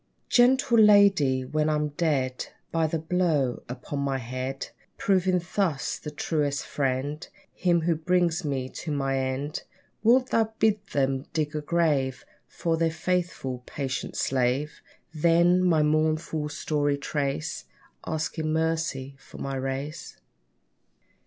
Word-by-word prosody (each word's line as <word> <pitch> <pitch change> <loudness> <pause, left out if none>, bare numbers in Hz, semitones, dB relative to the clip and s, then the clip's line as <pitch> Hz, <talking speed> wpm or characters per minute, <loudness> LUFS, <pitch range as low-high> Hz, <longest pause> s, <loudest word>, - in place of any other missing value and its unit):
Gentle 245 -1 +4
lady, 195 -12 +5
when 155 +3 0
I'm 150 -1 0
dead 145 -5 -1 0.2
By 165 -1 +2
the 165 - -1
blow 160 -6 0
upon 130 +3 -5
my 140 -1 0
head, 130 +2 -5 0.3
Proving 185 -2 +2 0.2
thus, 165 -9 0
the 150 - -6
truest 145 -2 -1
friend, 140 +3 -2 0.3
Him 175 -2 +2
who 170 +1 +2
brings 175 +1 +1
me 135 -4 -2
to 155 - -6
my 135 -2 0
end; 130 +3 -2 0.4
Wilt 250 +4 +4
thou 225 -1 +2
bid 215 -2 +2
them 135 0 0
dig 155 -1 -1
a 150 - -1
grave 145 -6 0 0.2
For 165 -1 -1
their 165 0 +2
faithful, 160 -6 -2
patient 135 -2 -4
slave; 130 +3 0 0.3
Then, 170 +3 +4
my 165 -4 +4
mournful 155 0 0
story 145 -1 0
trace, 140 - -3 0.4
Asking 160 0 -2
mercy 160 -4 -1
for - - -14
my 135 0 -4
race? 135 +4 -4
150 Hz, 125 wpm, -26 LUFS, 135-170 Hz, 0.4 s, lady